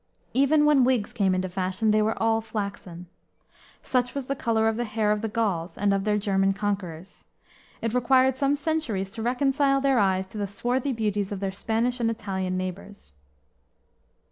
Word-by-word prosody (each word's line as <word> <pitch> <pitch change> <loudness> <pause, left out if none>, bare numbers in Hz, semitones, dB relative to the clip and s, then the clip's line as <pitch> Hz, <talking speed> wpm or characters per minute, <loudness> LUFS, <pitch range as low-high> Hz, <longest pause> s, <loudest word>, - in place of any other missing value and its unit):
Even 290 +3 +4
when 295 -3 +5
wigs 245 -4 +1
came 195 -5 +1
into 185 0 -1
fashion 185 +4 -1
they 215 0 +3
were 220 +1 0
all 225 0 +2
flaxen. 200 -5 -6 0.8
Such 245 0 0
was 275 -2 -3
the 275 - -2
color 225 -4 +1
of 225 - +1
the 240 - -1
hair 215 -2 0
of 210 0 0
the 225 - -2
Gauls 200 -6 -2
and 200 -1 +2
of 195 0 -1
their 210 -1 +2
German 195 -1 +1
conquerors. 195 -4 -4 0.6
It 230 -1 -1
required 255 +1 +3
some 275 +1 +1
centuries 280 -11 -2
to 225 - -7
reconcile 275 +3 +2
their 270 -2 +2
eyes 190 -2 +2
to 215 - -5
the 200 - -1
swarthy 245 +7 -1
beauties 210 -4 -1
of 200 - -3
their 195 -1 -2
Spanish 230 +5 -1
and 230 -1 +1
Italian 190 -4 -3
neighbors. 185 - -7
220 Hz, 180 wpm, -26 LUFS, 195-250 Hz, 0.8 s, when